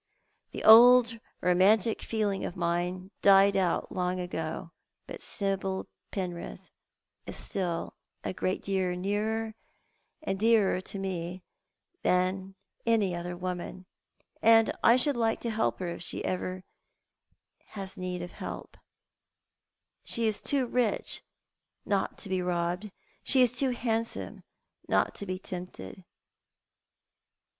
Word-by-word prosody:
The - - -6
old 235 +1 +8 0.2
romantic 195 +5 +3
feeling 210 -3 -1
of - - -4
mine 180 +2 -2
died 195 0 +6
out 185 -3 +1
of - - -18
me - - -8
long 180 0 0
ago; 165 -1 -4 0.3
but - - -9
Sibyl 195 -1 -2 0.2
Penrith 180 -3 -6 0.6
is - - -5
still 175 -4 -2 0.3
a - - -3
great 185 0 -2
deal 190 -2 0
nearer 215 +4 -1 0.7
and 195 -10 -2
dearer 215 -4 +3
to 195 - -6
me 185 -1 -4 0.6
than 185 +1 0 0.3
any 220 -5 +2
other 175 0 -5
woman, 185 +1 -5 0.6
and 225 0 +6
I 230 - +7
should 280 +2 +2
like 225 -1 +1
to 235 - -2
help 220 0 0
her 180 -2 -3
if 170 +1 -3
ever 185 0 -3
she - - -30
have 195 -1 -5
need 180 -1 -4
of 175 - -7
help - - -8 1.3
She 235 -2 0
is 215 -2 0
too 275 -3 +1
rich 240 -3 0 0.6
not 200 -2 -1
to - - -5
be 185 -1 -1
robbed; 180 +3 -1 0.3
she 260 -2 +5
is 245 - +4
too 260 +2 +2
handsome 230 -2 -2 0.5
not - - +2
to 200 - -5
be 185 0 -2
tempted. 180 - -8
190 Hz, 130 wpm, -29 LUFS, 180-225 Hz, 1.3 s, old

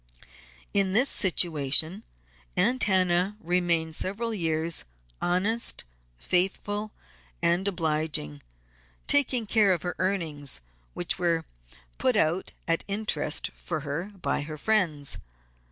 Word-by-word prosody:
In 195 -2 +2
this 245 +6 +4
situation 165 0 +3 0.6
Aunt 245 +5 +3
Hannah 185 0 +2
remained 175 -4 +1
several 215 +7 -3
years, 165 -3 0 0.4
honest, 200 +6 0 0.3
faithful, 205 - -1 0.5
and 175 +3 +2
obliging, 155 - -1 0.6
taking 260 -5 +4
care 210 -2 +4
of 175 -4 0
her 175 - -3
earnings, 160 - -2 0.3
which 175 +1 -2
were 165 -2 +1 0.5
put 255 -2 +2
out 170 -1 +1 0.2
at 165 0 +1
interest 210 +2 -1
for 160 -4 -4
her 145 +4 -3
by - - 0
her 155 +1 -6
friends. 165 -8 +1
180 Hz, 105 wpm, -27 LUFS, 160-205 Hz, 0.6 s, this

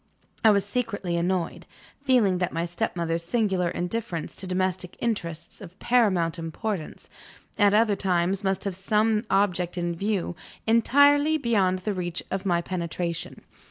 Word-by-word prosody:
I 220 - +7
was 200 -2 +3
secretly 205 -5 -2
annoyed, 175 +1 -1 0.4
feeling 230 -9 +3
that 180 - -1
my 165 +1 -1
stepmother's 170 -1 -2
singular 190 -2 0
indifference 180 -3 -4
to 190 - -4
domestic 185 -1 -2
interests 170 -9 -4
of 185 -2 -11
paramount 185 -9 +2
importance, 165 +2 -5 0.5
at 205 -1 +5
other 215 -1 +4
times, 185 +1 0
must 190 -1 0
have 200 -3 -3
some 210 +3 +1
object 180 -3 +1
in 175 0 -1
view, 195 -1 -2 0.3
entirely 285 +6 +4
beyond 200 -9 +1
the 210 - 0
reach 175 -2 -4
of 195 +1 -2
my 170 -1 +2
penetration. 170 -1 -4
190 Hz, 140 wpm, -26 LUFS, 175-215 Hz, 0.5 s, I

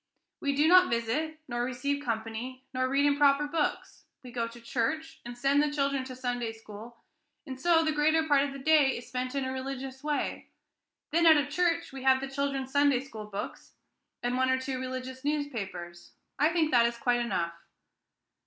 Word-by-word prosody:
We 280 -1 -1
do 295 +3 +4
not 365 +1 +7
visit, 245 +8 -1
nor 240 -1 -2
receive 280 +3 -2
company, 230 +2 -4
nor 255 0 0
read 275 +2 +2
improper 285 0 +4
books. 300 +1 -2 0.2
We 250 - -10
go 235 -1 -2
to 230 +1 -12
church, 310 +7 -2
and 240 0 -8
send 275 +3 +3
the 300 - +1
children 275 -2 0
to 255 -1 -8
Sunday 245 -2 -3
school, 225 +1 -11 0.5
and 260 -1 -8
so 330 +1 +4
the 310 - +2
greater 310 +1 +2
part 285 -2 +4
of 280 0 -1
the 275 - -7
day 285 -1 +4
is 240 - -9
spent 255 +1 -3
in 275 -1 -1
a 260 - -2
religious 265 0 -6
way. 300 -1 -2 0.6
Then 335 +1 +4
out 315 -1 +8
of 285 -1 0
church 335 -1 0
we 270 - -7
have 260 0 +4
the 270 - -4
children's 270 -1 -2
Sunday 285 -2 +3
school 225 -6 -9
books, 205 -1 -7 0.5
and 245 +1 0
one 260 0 +2
or 260 0 +2
two 260 0 -3
religious 260 0 -6
newspapers. 210 -13 -4 0.3
I 300 +2 +5
think 325 -2 +1
that 235 -1 +5
is 235 0 -4
quite 240 0 +1
enough." 175 -8 -1
265 Hz, 190 wpm, -29 LUFS, 245-290 Hz, 0.6 s, out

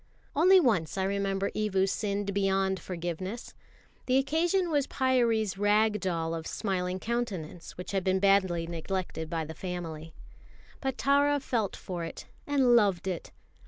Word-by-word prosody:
Only 370 +6 +7
once 205 - +1
I 190 - +1
remember 195 0 -1
Evu 195 -3 +1
sinned 200 0 -2
beyond 195 -1 +1
forgiveness. 180 +5 -5 0.5
The 255 0 +4
occasion 330 +6 +1
was 285 -2 +1
Pyârie's 230 -6 +1
rag 210 +1 +3
doll 165 -3 -1
of 160 -1 -4
smiling 185 -3 -2
countenance, 190 -8 -4
which 180 - -6
had 195 -2 0
been 190 0 +2
badly 190 -4 +3
neglected 170 -1 -4
by 165 -2 -2
the 160 - -7
family. 165 -2 -6 0.6
But 265 -2 -2
Tara 285 +1 +3
felt 230 -7 -1
for 175 -2 -5
it 165 - -7 0.2
and 265 -4 +4
loved 200 -5 +3
it. 180 -3 -4
195 Hz, 145 wpm, -29 LUFS, 180-240 Hz, 0.6 s, Only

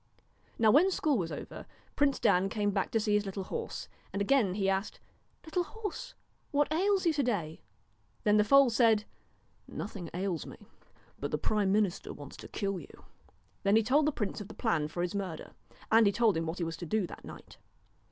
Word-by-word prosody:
Now 220 -2 +5
when 320 - +6
school 310 -6 +1
was 175 -7 -1
over, - - -7 0.3
Prince 285 -2 +2
Dan 185 +2 +3
came 205 -1 0
back 195 -1 -1
to 225 - +1
see 210 -1 0
his 210 -1 +2
little 195 0 -4
horse, - - -5 0.2
and 200 - -3
again 200 -3 +2
he 195 -2 0
asked: 195 +2 -1 0.2
' - - -29
Little 340 +3 0
horse! 445 +5 -7 0.3
what 290 +1 +1
ails 390 +3 +2
you 330 - +4
to 295 - +1
day? 190 - -2 0.3
' 105 0 -39
Then 210 0 +4
the 210 - +5
foal 275 +3 +6
said: 225 -2 +4 0.3
' - - -40 0.2
Nothing 195 -5 -6
ails 180 -3 -2
me; - - -10 0.6
but 145 - -3
the 150 - -1
prime 205 +4 +1
minister 205 -3 0
wants 145 -1 -10
to - - -10
kill 195 -2 -2
you.' - - -14 0.6
Then 200 +1 +3
he 225 - +5
told 285 +7 +3
the - - +3
prince 210 -5 -3
of 205 - -7
the 220 - -11
plan 170 -11 0
for 175 +3 -3
his 175 - -2
murder; 190 -6 -4 0.4
and 225 -1 +6
he - - +4
told 215 0 +3
him 165 0 -1
what 160 +3 -3
he 175 - -2
was 165 0 -4
to 175 - -7
do 215 +2 +1
that - - -10
night. - - -12
210 Hz, 215 wpm, -31 LUFS, 185-260 Hz, 0.6 s, when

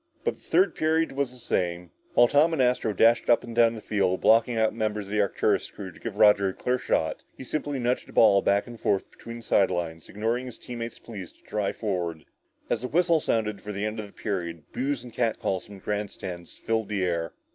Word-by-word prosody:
But - - -1
the - - -27
third 375 - +2
period 160 +1 +1
was 140 -1 -1
the 125 - -12
same. 90 -7 -2 0.2
While 120 - +7
Tom 150 +5 +4
and 160 - -1
Astro 125 -3 +2
dashed 115 +3 +3
up 120 - +5
and 115 -1 -8
down 115 -1 +4
the 110 - -8
field, 95 -3 +1
blocking 115 +1 +4
out 110 -1 +3
the - - -14
members 105 -2 -2
of 100 - -11
the 105 0 +2
Arcturus 100 - +1
crew 95 -2 -8
to - - -17
give 115 -3 -5
Roger 105 -2 +5
a - - -5
clear 125 0 0
shot, 80 -8 0 0.2
he - - -8
simply 145 +1 -3
nudged 125 0 -1
the - - -14
ball 100 -3 +6
back 100 +1 +2
and 120 -2 -10
forth 100 -2 0
between 115 0 -9
the 115 - -11
side 100 -2 +3
lines, 85 -3 -4
ignoring 115 +5 -2
his 125 - -9
teammates' 120 -1 -6
pleas 100 -7 -9
to - - -30
drive 105 -2 -2
forward. 85 -7 -3 0.4
As - - -1
the 125 - -3
whistle 170 +2 +3
sounded 110 -8 -1
for 105 - -6
the 100 +1 -3
end 110 +1 -3
of 105 - -5
the - - -17
period, 85 -7 -4
boos 135 -1 -1
and 120 -2 -11
catcalls 110 -5 -1
from 105 - -11
the 95 - -13
grandstand 95 -4 -4
filled 110 -2 -2
the 100 -3 -1
air. 85 -2 -1
110 Hz, 235 wpm, -26 LUFS, 95-120 Hz, 0.4 s, While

